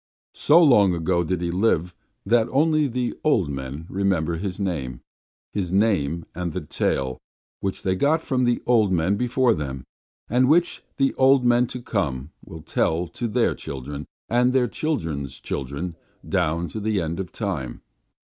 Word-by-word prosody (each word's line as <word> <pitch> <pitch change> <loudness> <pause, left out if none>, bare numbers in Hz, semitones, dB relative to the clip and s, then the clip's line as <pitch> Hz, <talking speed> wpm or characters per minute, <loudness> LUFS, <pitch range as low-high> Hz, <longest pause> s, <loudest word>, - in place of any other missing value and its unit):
So 165 +4 +5
long 105 - +5
ago 85 +1 +1
did 85 +1 -2
he 85 -1 -1
live 90 -2 +1 0.3
that 115 +2 +3
only 155 +1 +3
the 125 -1 -2
old 105 - +2
men 70 +3 -6
remember 90 -4 0
his 95 +1 -4
name, 70 -11 -3 0.5
his 95 -4 -2
name 85 -6 +1
and 85 -2 -4
the 90 - -3
tale, 65 -3 -1 0.4
which 95 -1 -3
they 95 - +1
got 150 - +2
from 130 -3 0
the 120 -1 +1
old 110 -5 +3
men 90 +2 +2
before 125 +2 +2
them, 70 - -4 0.4
and 125 +3 +3
which 170 +3 +3 0.2
the 135 - +2
old 135 -1 +5
men 120 0 +4
to 125 0 -7
come 70 - -2
will 80 -1 -10
tell 80 +2 0
to 120 +8 -4
their 115 +2 +1
children 70 +2 -7 0.2
and 125 +2 +2
their 130 -2 +3
children's 80 - -3
children 70 +6 -4 0.3
down 85 +3 0
to 110 - -5
the 105 -1 0
end 85 0 -3
of 95 -2 -5
time. 80 - -4
95 Hz, 165 wpm, -24 LUFS, 80-120 Hz, 0.5 s, So